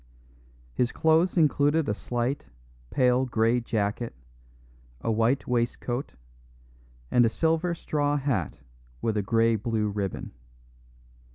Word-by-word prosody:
His 125 Hz, -, 0 dB
clothes 160 Hz, +3 st, +2 dB
included 150 Hz, 0 st, +3 dB
a 105 Hz, -, +1 dB
slight, 120 Hz, +5 st, -3 dB, 0.4 s
pale 125 Hz, -, +3 dB
grey 115 Hz, +1 st, +2 dB
jacket, 115 Hz, -, -2 dB, 0.8 s
a 115 Hz, -, -1 dB
white 115 Hz, +5 st, +1 dB
waistcoat, 120 Hz, +2 st, -1 dB, 1.0 s
and 125 Hz, -, +5 dB
a 115 Hz, -, +4 dB
silver 165 Hz, +6 st, 0 dB
straw 145 Hz, -2 st, 0 dB
hat 130 Hz, -, -1 dB, 0.5 s
with 110 Hz, -, 0 dB
a 105 Hz, -, +1 dB
grey 115 Hz, +2 st, +2 dB
blue 110 Hz, 0 st, -1 dB
ribbon. 100 Hz, -2 st, -4 dB
120 Hz, 110 wpm, -27 LUFS, 115-145 Hz, 1.0 s, and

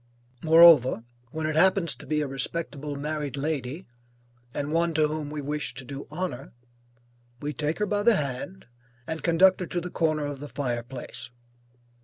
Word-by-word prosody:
Moreover, 160 Hz, -7 st, +7 dB, 0.3 s
when 160 Hz, +4 st, -4 dB
it 155 Hz, 0 st, -1 dB
happens 185 Hz, 0 st, +4 dB
to -, -, -12 dB
be 150 Hz, -1 st, +1 dB
a 150 Hz, -, -1 dB
respectable 145 Hz, +1 st, -4 dB
married 145 Hz, -1 st, -3 dB
lady, 145 Hz, +2 st, -3 dB, 0.7 s
and 145 Hz, +3 st, -3 dB
one 165 Hz, 0 st, +1 dB
to 155 Hz, -1 st, +4 dB
whom 150 Hz, -1 st, -4 dB
we 150 Hz, 0 st, -4 dB
wish 150 Hz, +1 st, -3 dB
to 130 Hz, -, -8 dB
do 140 Hz, +2 st, -7 dB
honor, 170 Hz, -4 st, -5 dB, 0.9 s
we 150 Hz, +1 st, -4 dB
take 150 Hz, +3 st, -2 dB
her 210 Hz, -, 0 dB
by 205 Hz, 0 st, 0 dB
the 230 Hz, +1 st, +5 dB
hand 150 Hz, +6 st, -4 dB, 0.4 s
and 160 Hz, +2 st, -4 dB
conduct 180 Hz, +3 st, +4 dB
her 180 Hz, -, -4 dB
to 175 Hz, -, -2 dB
the 175 Hz, +1 st, -6 dB
corner 155 Hz, -3 st, 0 dB
of 145 Hz, -1 st, -5 dB
the 145 Hz, +1 st, -8 dB
fire 125 Hz, -3 st, -2 dB
place. 125 Hz, +1 st, -8 dB
150 Hz, 175 wpm, -26 LUFS, 140-170 Hz, 0.9 s, Moreover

